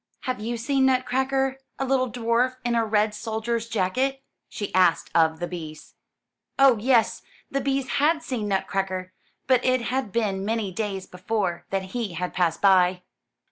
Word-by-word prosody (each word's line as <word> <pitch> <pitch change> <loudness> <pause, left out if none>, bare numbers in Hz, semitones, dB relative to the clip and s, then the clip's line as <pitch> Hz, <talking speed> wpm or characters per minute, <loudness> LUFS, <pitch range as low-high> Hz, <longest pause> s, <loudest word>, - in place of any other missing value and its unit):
Have 255 -3 -3
you 235 +3 -3
seen 265 +3 +2
Nutcracker 265 +1 +1
— - - -50
a 270 - -1
little 255 -2 +1
dwarf 240 +2 +1
in 240 - +1
a 230 -1 +2
red 215 -1 +1
soldier's 225 +1 -3
jacket?'* 255 +7 0 0.3
she 205 - -5
asked 185 -2 +3
of 160 -1 +3
the 175 - -2
bees. 160 -4 -8 0.6
Oh, 270 -5 +6
yes 235 0 +2 0.3
the 275 - 0
bees 270 0 -1
had 310 +4 +2
seen 235 -8 -3
Nutcracker, 190 -1 -2 0.3
but 255 -1 +3
it 255 -1 +2
had 250 -2 -2
been 195 -3 -1
many 215 -2 -1
days 195 -1 -3
before 180 -1 -3
that 190 -1 -3
he 230 -7 -3
had 180 +2 -3
passed 175 -1 0
by. 185 -2 +4
225 Hz, 165 wpm, -25 LUFS, 190-255 Hz, 0.6 s, Oh